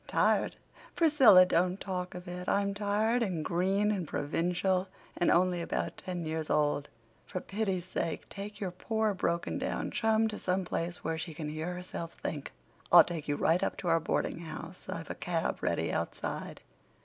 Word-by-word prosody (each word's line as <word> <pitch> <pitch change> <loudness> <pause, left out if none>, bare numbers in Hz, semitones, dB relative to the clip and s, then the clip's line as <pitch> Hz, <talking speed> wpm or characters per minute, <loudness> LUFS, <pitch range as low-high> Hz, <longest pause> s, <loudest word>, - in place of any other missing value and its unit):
"Tired! - - +2 0.4
Priscilla, 270 - +7
don't 180 +2 +1
talk 180 -2 -4
of 180 +1 -8
it. 180 0 -4
I'm 200 0 +2
tired, 210 +4 +1
and 180 -8 -1
green, 195 +4 +2
and 185 -6 -2
provincial, 180 +6 0 0.3
and 175 - +2
only 180 0 +3
about - - -2
ten 180 -2 -4
years 160 0 -3
old. 145 -1 +1 0.4
For 185 - -3
pity's 195 -2 -2
sake 170 -3 -3
take 205 +1 -7
your 190 -3 -2
poor, 220 +3 0
broken 170 -2 -1
down - - -2
chum 220 0 +2
to 215 - -5
some 185 0 0
place 175 +1 -3
where 160 0 -2
she 165 -1 -5
can 155 -2 -4
hear 160 +4 -3
herself 175 -2 -6
think." 145 -3 -5 0.4
"I'll - - +10
take 165 -4 -5
you 145 - +1
right 165 +4 +2
up - - -1
to 175 - -2
our 165 0 +4
boardinghouse. 165 +1 -4
I've - - -4
a - - -2
cab - - -2
ready - - 0
outside." - - -4
180 Hz, 175 wpm, -31 LUFS, 165-200 Hz, 0.4 s, I'll